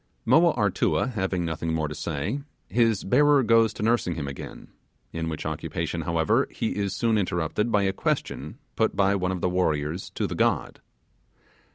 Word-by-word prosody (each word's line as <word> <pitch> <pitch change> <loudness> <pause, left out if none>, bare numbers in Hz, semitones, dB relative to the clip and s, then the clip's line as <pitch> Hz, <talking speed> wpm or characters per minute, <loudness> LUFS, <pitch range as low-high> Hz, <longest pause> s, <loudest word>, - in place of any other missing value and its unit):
Moa 160 +8 +5
Artua 105 +3 +1
having 95 -5 -1
nothing 80 0 -2
more 80 -1 0
to 75 - -6
say, 75 - -3 0.3
his 115 -3 +2
bearer 145 +5 +4
goes 115 -1 +4
to - - -5
nursing 110 -6 +1
him 75 -3 -4
again, 70 - -8 0.4
in 80 0 -3
which 80 - -5
occupation, 80 -1 -3
however, 85 +10 +1
he 115 - -3
is 100 -1 -2
soon 110 +1 +2
interrupted 90 +4 -1
by 105 -2 +3
a 95 0 +1
question - - -3 0.2
put - - +1
by 100 0 +3
one 95 -2 0
of 90 -2 -4
the - - +2
warriors 80 -2 -1
to - - -1
the - - -3
god. - - 0
95 Hz, 175 wpm, -26 LUFS, 80-115 Hz, 0.4 s, Moa